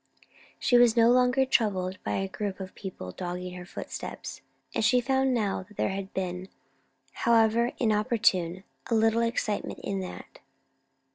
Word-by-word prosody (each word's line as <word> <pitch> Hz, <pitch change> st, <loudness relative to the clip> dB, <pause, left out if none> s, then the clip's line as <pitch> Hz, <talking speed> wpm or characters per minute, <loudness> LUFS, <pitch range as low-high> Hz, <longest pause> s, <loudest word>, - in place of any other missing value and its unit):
She 245 Hz, -, +3 dB
was 240 Hz, -1 st, +5 dB
no 230 Hz, +1 st, +6 dB
longer 250 Hz, +1 st, +4 dB
troubled 190 Hz, -7 st, 0 dB
by -, -, -2 dB
a 195 Hz, -, -1 dB
group 200 Hz, 0 st, -4 dB
of 190 Hz, -1 st, -7 dB
people 180 Hz, -, -7 dB
dogging 180 Hz, -, -5 dB
her 180 Hz, -1 st, -9 dB
footsteps; -, -, -7 dB, 0.3 s
and -, -, 0 dB
she 250 Hz, +3 st, +5 dB
found 265 Hz, +1 st, +1 dB
now 210 Hz, -7 st, 0 dB
that 210 Hz, -, -19 dB
there -, -, +1 dB
had 195 Hz, 0 st, -4 dB
been, 185 Hz, 0 st, -4 dB, 0.6 s
however 230 Hz, +1 st, +3 dB
inopportune, 210 Hz, -6 st, +1 dB, 0.3 s
a 230 Hz, -, +2 dB
little 225 Hz, +1 st, +3 dB
excitement 230 Hz, -2 st, -1 dB
in 195 Hz, -1 st, -2 dB
that. 185 Hz, -1 st, -8 dB
210 Hz, 150 wpm, -28 LUFS, 190-235 Hz, 0.6 s, no